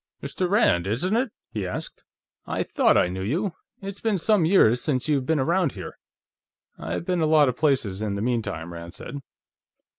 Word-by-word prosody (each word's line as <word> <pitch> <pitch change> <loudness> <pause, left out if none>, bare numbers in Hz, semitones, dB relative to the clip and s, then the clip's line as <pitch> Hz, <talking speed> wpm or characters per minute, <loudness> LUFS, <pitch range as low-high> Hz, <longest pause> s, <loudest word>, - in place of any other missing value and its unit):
"Mr. 180 -1 -2
Rand, 135 - +3
isn't 150 - 0
it?" 245 0 0 0.2
he 105 -5 -3
asked. 90 - -6 0.4
"I - - -1
thought - - +3
I - - +4
knew 95 +1 -5
you. 165 - -1 0.3
It's 195 0 -6
been 220 -3 +1
some 190 0 +3
years 125 - +4
since 130 -3 0
you've 140 -4 +1
been 160 -2 +2
around 170 +2 +1
here." - - -9 0.8
"I've 80 - -4
been 180 -2 0
a 155 - +3
lot 155 -2 +5
of 125 - -2
places 125 -10 +1
in 105 -2 -2
the 100 - -3
meantime," 100 -9 -2
Rand 85 0 -9
said. 145 - -7
140 Hz, 185 wpm, -25 LUFS, -, 0.8 s, lot